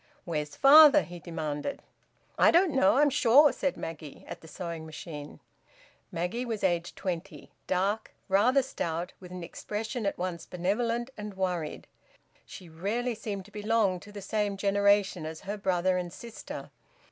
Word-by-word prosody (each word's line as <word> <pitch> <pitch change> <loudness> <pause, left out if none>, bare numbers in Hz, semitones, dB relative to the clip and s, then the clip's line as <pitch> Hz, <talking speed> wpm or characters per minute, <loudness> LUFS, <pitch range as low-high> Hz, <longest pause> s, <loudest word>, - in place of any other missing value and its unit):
"Where's 150 -4 -3
father?" 295 +1 +8
he 175 0 -9
demanded. 155 - -4 0.5
"I - - +5
don't 345 0 +4
know, 260 -3 +4
I'm 290 0 +4
sure," 285 +2 +6
said 280 - -2
Maggie, 155 -3 -8
at - - -8
the 160 - -13
sewing 170 -1 -6
machine. 155 -2 -9 0.7
Maggie 180 +9 -2
was 225 -4 -4
aged 175 -2 0
twenty; 185 0 -5 0.2
dark, 195 +4 0 0.2
rather 240 +8 +4
stout, 170 -8 -4
with 180 -1 -12
an 180 -1 -6
expression 215 +5 -4
at - - -2
once 175 -2 -4
benevolent 230 +7 -1
and 210 -1 -6
worried. 180 -5 -3 0.6
She 180 - -11
rarely 205 +10 -2
seemed 200 -3 -5
to 210 - -17
belong 210 -3 +1
to 205 - -13
the 205 -1 -8
same 205 0 -1
generation 200 -2 +2
as 160 0 -6
her 205 +2 -4
brother 185 -2 +1
and 175 -1 -3
sister. 235 +3 -9
195 Hz, 155 wpm, -29 LUFS, 175-225 Hz, 0.7 s, father